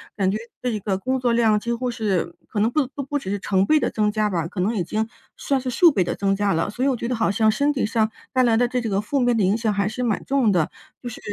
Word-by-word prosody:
感 195 -2 +1
觉 200 - 0 0.2
这 240 -4 -1
个 195 -1 -1
工 260 +5 -1
作 245 -2 +1
量 225 -3 +3
几 235 +3 -2
乎 250 +1 -2
是 205 -8 -1
可 210 - -3
能 215 +2 +3
不 285 +3 +1
不 285 - -4
不 280 +2 -2
只 195 -9 -5
是 205 - -2
成 190 -1 +1
倍 310 +8 +4
地 - - 0
增 210 -1 0
加 215 0 0
吧， 170 -4 -1
可 180 - -7
能 205 +6 0
已 190 - 0
经 215 +6 -2 0.3
算 275 -1 0
是 255 0 -4
数 340 +7 +5
倍 195 -10 +1
地 - - -2
增 195 -1 0
加 200 -1 +1
了。 165 +4 0
所 245 +6 -2
以 - - +3
我 270 - +2
觉 235 - -4
得 250 - -1
好 225 -3 +1
像 220 +2 +3
身 285 +7 +1
体 265 - -1
上 220 0 +1 0.2
带 255 -2 +3
来 235 -2 +3
的 245 +2 +3
这 250 +1 -1
个 210 -4 -1
负 275 +7 -1
面 245 -1 +2
的 220 - +2
影 195 +4 +2
响 220 -2 0
还 200 0 0
是 250 +4 -3
蛮 225 -4 -1
重 265 -6 +2
的， 170 -5 +1 0.3
就 - - -7
是 235 - -9
220 Hz, 330 characters per minute, -23 LUFS, 200-250 Hz, 0.3 s, 数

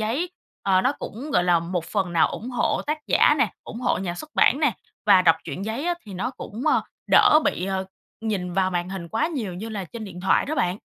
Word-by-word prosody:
giấy, 265 +12 -1 0.3
ờ, 190 -1 +3
nó 255 +6 +2
cũng, 270 +8 -7
gọi 175 - +3
là, 175 -1 +4
một 170 0 -3
phần 190 -4 -2
nào 165 - +4
ủng 240 +4 -6
hộ 245 - 0
tác 305 +1 -1
giả - - +5
nè, - - +2
ủng 230 - -8
hộ - - +1
nhà 175 -2 -3
xuất 305 +12 -9
bản 280 - +4
nè, 285 -6 +3 0.3
và 185 - +7
đọc 165 -2 +5
truyện 195 - -5
giấy 235 +9 -3
á, 350 - +1
thì 195 - -8
nó 225 +8 -2
cũng, 230 -2 -8
ờ, - - +3 0.3
đỡ 305 - +7
bị, 180 - 0
ờ, 190 -1 -1 0.4
nhìn 195 -5 -2
vào 190 0 +1
màn 175 0 -2
hình 185 -3 -6
quá 225 - 0
nhiều 235 - -4
như 215 +5 -6
là 205 -4 -4
trên 220 +5 -8
điện 180 -3 -9
thoại 190 - +2
đó 310 - -2
bạn. 180 -3 0
200 Hz, 245 wpm, -24 LUFS, 180-245 Hz, 0.4 s, và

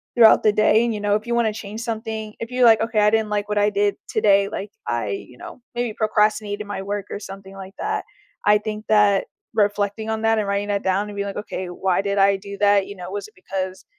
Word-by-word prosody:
throughout 230 -3 +7
the 215 - +5
day, 215 +1 +4
and, 235 - 0
you 210 - -4
know, 205 0 +2
if 215 +2 -3
you 235 - 0
wanna 230 -2 +2
change 215 +1 -7
something 220 -2 -4
if 230 - -5
you're 250 0 +3
like, 225 -2 +6
"Okay. 225 -1 0
I 210 - +5
didn't 220 0 +1
like 210 0 -2
what 210 - -1
I 205 0 +4
did 205 0 +1
today," 200 -2 +3
like, 205 -1 -6 0.2
"I, 120 -3 -1
you 125 +5 -6
know, 255 - -10
maybe 240 -2 -1
procrastinated 210 -1 0
my 205 -1 -4
work, 200 0 -4
or - - -5
something 195 -1 -10
like 195 0 -10
that" - - -2 0.4
I 210 0 +6
think 215 0 -5
that 210 -2 +4 0.3
reflecting 205 0 0
on 220 0 -2
that 225 0 +3
and 210 - -1
writing 200 +1 -1
that 200 -1 -1
down 190 +2 +1
and 205 - -8
being 200 0 -2
like, 200 - -5
"Okay. 190 -3 -5
Why 185 +1 0
did 200 0 -2
I 200 0 +5
do 200 +1 -8
that, 205 -1 +4
you 200 - -8
know? 180 -1 -8
Was 200 +1 -5
it - - -30
because 185 0 -5
205 Hz, 250 wpm, -22 LUFS, 200-220 Hz, 0.4 s, throughout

